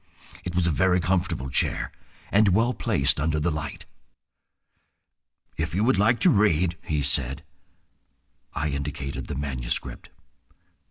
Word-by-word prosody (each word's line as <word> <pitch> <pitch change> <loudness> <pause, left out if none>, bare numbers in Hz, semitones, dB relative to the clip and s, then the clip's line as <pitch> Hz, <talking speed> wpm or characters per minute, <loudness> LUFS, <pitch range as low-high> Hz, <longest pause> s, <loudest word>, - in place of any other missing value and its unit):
It 90 -1 -5
was 90 -1 +2
a 85 - +2
very 90 +4 +2
comfortable 85 -7 -1
chair, - - +2 0.4
and 100 -2 +4
well 115 +4 +2
placed 85 - +1
under 75 +1 0
the 85 +3 0
light. 75 -2 -4 1.7
"If 80 0 -2
you 100 - +1
would 115 -4 +3
like 110 +3 +3
to - - +5
read—" 90 -4 +2
he 75 -2 -1
said. 70 -1 -1 1.1
I 75 +2 -1
indicated 70 -1 -4
the - - -4
manuscript. 65 -3 -3
80 Hz, 130 wpm, -25 LUFS, 70-95 Hz, 1.7 s, to